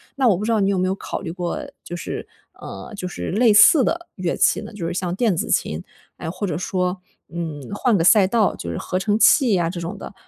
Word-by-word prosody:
那 260 -4 +3
我 185 - +3
不 210 - -4
知 230 - 0
道 215 - +2
你 195 - +2
有 200 - +1
没 185 0 +1
有 190 - 0
考 - - -5
虑 165 - -6
过， 175 0 -4 0.2
就 175 - -9
是 - - -5 0.3
呃， - - -10
就 185 - -6
是 90 - -5
类 225 +3 +4
似 275 - +7
的 345 +4 -2
乐 180 -2 -2
器 - - +3
呢？ - - -9
就 185 -6 -5
是 - - -3
像 180 -1 -2
电 205 -1 +1
子 - - -3
琴， 80 +2 0 0.3
哎， 160 - -6
或 200 +2 -4
者 175 - -2
说， 180 +1 -2 0.3
嗯， 160 -4 -5
换 225 -1 +2
个 - - 0
赛 195 +4 +6
道， 215 0 +1
就 85 - -6
是 80 - -4
合 185 - -3
成 205 +3 0
器 225 - +5
啊 165 - 0
这 170 -1 -6
种 170 - -5
的。 - - -9
185 Hz, 275 characters per minute, -21 LUFS, 170-215 Hz, 0.3 s, 似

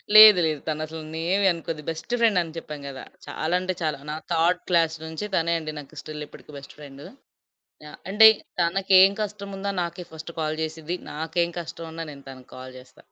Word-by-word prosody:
లేదు. 215 -3 +11
లేదు. 155 -2 -1
తనసలు 155 +1 -4
ఏవీ 185 +5 +1
అనుకోదు. 165 -2 -6
బెస్ట్ 165 +9 -5
ఫ్రెండని 180 -8 +2
చెప్పాను 150 -3 -7
కదా! 130 -1 -8 0.2
చాలా, 160 +3 -3
అంటే 185 0 -2
చాలా. 155 -3 -1
నా - - -3 0.2
థర్డ్ 170 +2 +2
క్లాస్ 165 -2 +3
నుంచి, 160 +6 -5
తనే 170 +1 +1
అండి 155 -1 -6
నాకు 140 - -13
స్టిల్ 150 -1 -7
ఇప్పటికీ - - -15
బెస్ట్ 140 - -11
ఫ్రెండు. 140 -1 -11 0.8
ఆ! - - -10 0.2
అంటే 220 +2 +8 0.3
తనకేం 190 +2 +5
కష్టముందో, 200 -1 -5
నాకే 170 +1 -5
ఫస్ట్ 160 +1 -8
కాల్ 155 0 -1
చేసిద్ది. 160 +2 -4 0.2
నాకేం 165 +3 -1
కష్టం 165 0 -8
ఉన్నా, 165 0 -5
నేను 140 -1 -14
తనకి 130 -1 -13
కాల్ 130 0 -10
చేస్తా. 130 0 -19
165 Hz, 175 wpm, -25 LUFS, 155-180 Hz, 0.8 s, లేదు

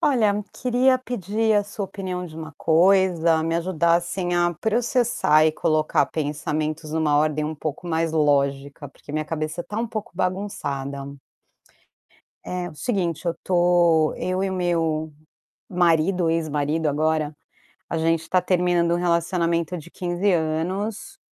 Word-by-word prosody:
Olha, 240 -10 +3 0.2
queria 255 +1 +2
pedir 220 -2 -1
a 205 -1 +3
sua 205 0 -5
opinião 185 -2 -5
de 160 -2 -11
uma 160 -1 -8
coisa, 170 -1 +3
me 165 +1 0
ajudar, 170 -1 +2
assim, 175 +1 -3
a 175 0 +2
processar 225 -6 +2
e 155 - +4
colocar 155 0 +1
pensamentos 155 +1 -3
numa 155 -2 +2
ordem 150 0 +1
um 155 +1 -3
pouco 155 +3 -5
mais 165 -1 0
lógica, 140 -1 0
porque 145 - -15
minha 155 0 -1
cabeça 155 +2 -3
tá 205 +4 -7
um 235 - -1
pouco 215 -1 -5
bagunçada. 180 -7 -3 1.5
É 180 -1 -4
o 160 - -12
seguinte, 175 -1 -2
eu 170 - 0
tô 175 -3 +3
eu 185 +1 -2
e 195 - 0
o - - -3
meu 165 -4 -1 0.6
marido, 175 0 +2
ex-marido 155 -1 0
agora, 155 +1 0 0.6
a 165 - -1
gente 165 0 0
tá 185 - +3
terminando 175 -1 +2
um 175 - +1
relacionamento 170 0 0
de 165 +1 -11
15 180 +2 -1
anos, 190 +10 -2
170 Hz, 145 wpm, -23 LUFS, 155-185 Hz, 1.5 s, e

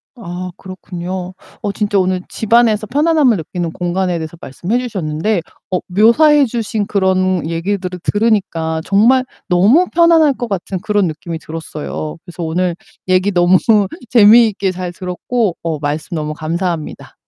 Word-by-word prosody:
아 180 -5 -6
그렇군요. 185 -1 -6 0.3
어 205 - -2
진짜 205 0 0
오늘 185 0 0
집안에서 220 -1 +2
편안함을 290 - +3
느끼는 170 +1 -4
공간에 180 0 -1
대해서 160 +1 -6
말씀해 180 - -2
주셨는데 190 -4 -2 0.3
어 185 - +1
묘사해 270 - +5
주신 220 -3 -2
그런 185 -3 +1
얘기들을 180 +2 -3
들으니까 190 -7 0
정말 240 +6 +4 0.2
너무 210 - +4
편안할 330 -3 +5
것 245 -2 -5
같은 190 -1 -3
그런 205 -4 +1
느낌이 160 +1 -5
들었어요. 155 -1 -6
그래서 175 -1 -7
오늘 175 +2 -1 0.3
얘기 185 +2 +2
너무 175 0 +4 0.5
재미있게 215 -3 +5
잘 180 -1 -5
들었고 185 +3 -2
어 160 -3 -3
말씀 150 +4 -3
너무 155 -1 -3
감사합니다. 165 +1 -4
185 Hz, 335 characters per minute, -16 LUFS, 170-220 Hz, 0.5 s, 묘사해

